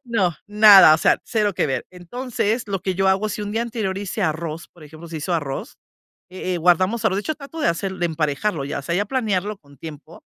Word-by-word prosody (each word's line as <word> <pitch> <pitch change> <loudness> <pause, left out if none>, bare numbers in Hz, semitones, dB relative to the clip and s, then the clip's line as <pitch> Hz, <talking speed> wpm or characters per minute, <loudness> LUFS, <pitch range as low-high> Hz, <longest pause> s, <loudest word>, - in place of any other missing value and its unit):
No, 195 -8 0
nada, 205 -6 +8
o - - 0
sea, - - +3
0 210 -3 0
que - - 0
ver. 130 -2 -2
Entonces, 225 +4 -3
lo 195 -2 -3
que 190 -1 -2
yo 190 +1 0
hago, 195 +3 +1
si 210 0 -4
un 205 0 -5
día 225 - -1
anterior 215 -5 -3
hice 205 +1 -4
arroz, 160 0 -3
por 170 - -17
ejemplo, 160 +3 -12
se 160 -1 -6
hizo 170 +4 -2
arroz, 145 -4 -4 0.5
eh 185 0 -4
eh, - - -2
guardamos 185 +6 +2
arroz. 190 - +2
De - - -1
hecho, 310 +7 -3
trato 305 +3 -9
de - - +3
hacer, 190 +3 -3
de 175 - -1
emparejarlo, 155 0 -2
ya 140 0 -4
sea, 170 +4 -3
ya 205 - 0
planearlo 210 -4 -1
con 140 -4 -21
tiempo 150 -2 -11
190 Hz, 230 wpm, -21 LUFS, 160-210 Hz, 0.5 s, nada